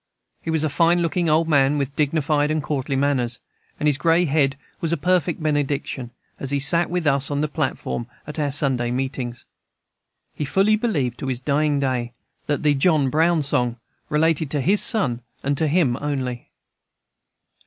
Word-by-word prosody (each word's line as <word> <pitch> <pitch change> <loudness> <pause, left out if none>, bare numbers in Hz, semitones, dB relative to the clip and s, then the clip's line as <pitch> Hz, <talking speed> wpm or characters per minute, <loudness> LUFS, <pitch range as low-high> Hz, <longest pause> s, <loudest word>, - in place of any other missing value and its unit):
He - - -6
was 160 -1 +1
a 155 - +1
fine 170 +4 +2
looking 170 0 0
old 160 +2 +3
man, 145 -2 +3
with 140 0 -3
dignified 150 0 +1
and 155 -1 -1
courtly 140 -1 -2
manners, 130 -3 0 0.4
and - - -2
his 145 -2 +2
gray 170 +1 +3
head 140 -2 +1 0.2
was 165 - -2
a 170 - +1
perfect 175 0 0
benediction, 145 -4 -1 0.3
as 135 - -4
he 140 - +1
sat 170 +5 +3
with 175 -1 -2
us 140 -1 +3
on 145 0 -1
the 155 - +1
platform 145 -5 -3 0.2
at 150 +2 -7
our 145 -1 0
Sunday 135 -4 +1
meetings. 125 -1 -4 0.9
He - - -4
fully 195 +9 +2
believed, 160 - -1
to 135 - -4
his 130 -2 -2
dying 145 +2 +1
day, 125 -3 -1 0.3
that 145 +1 -1
the 150 -1 +4
"John 145 -2 +2
Brown 160 +1 +2
Song" 125 -4 0 0.3
related 160 0 +1
to 145 -1 -1
his 200 +9 +3
son, 125 - +2 0.2
and 140 +1 0
to 160 - +1
him 150 -6 +2
only. 130 -4 -3
145 Hz, 175 wpm, -22 LUFS, 135-160 Hz, 0.9 s, the